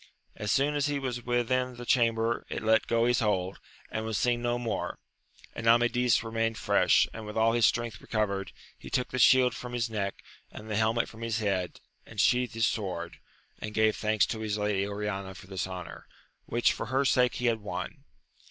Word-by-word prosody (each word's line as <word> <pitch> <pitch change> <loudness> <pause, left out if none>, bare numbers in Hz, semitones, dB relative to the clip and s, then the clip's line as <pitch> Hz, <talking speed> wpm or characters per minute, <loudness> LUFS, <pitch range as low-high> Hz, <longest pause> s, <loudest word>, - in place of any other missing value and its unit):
As 105 -1 -2
soon 140 +4 +2
as 145 0 +1
he 145 -1 -1
was 125 -3 -4
within 125 +1 0
the 120 0 -8
chamber 115 -1 +2
it - - -4
let 110 +1 +3
go 115 0 +2
his 120 0 +3
hold, 95 -4 0 0.3
and 110 - -2
was 110 -2 -2
seen 120 +4 +1
no 120 0 0
more, 120 -2 -3 0.6
and 115 - -4
Amadis 120 +1 +4
remained 115 0 -1
fresh, - - +3
and 110 - -7
with 105 - -6
all 115 +1 +4
his 120 -2 +5
strength 120 -2 -2
recovered; 100 -3 -2 0.3
he - - -10
took 125 - 0
the 130 - -3
shield 125 +1 +6
from 125 0 -7
his 120 -1 -1
neck 100 -3 -3 0.3
and 110 0 -9
the - - 0
helmet 110 +2 +2
from 110 - -12
his 115 -1 -1
head, 100 -5 -2 0.2
and 110 - -10
sheathed 125 +1 +2
his 115 -1 +2
sword, 90 -6 -3 0.4
and 105 0 -6
gave 110 -1 +3
thanks 110 -1 +2
to 110 - -4
his 110 -1 -2
lady 105 -1 0
Oriana 100 -2 -4
for 95 - -12
this 95 -1 -4
honour, 90 -2 -8 0.4
which 120 0 +2
for - - -5
her 135 +2 +1
sake 125 -2 +3
he 125 - -3
had 115 -2 +2
won. 105 - -6
115 Hz, 200 wpm, -29 LUFS, 105-120 Hz, 0.6 s, shield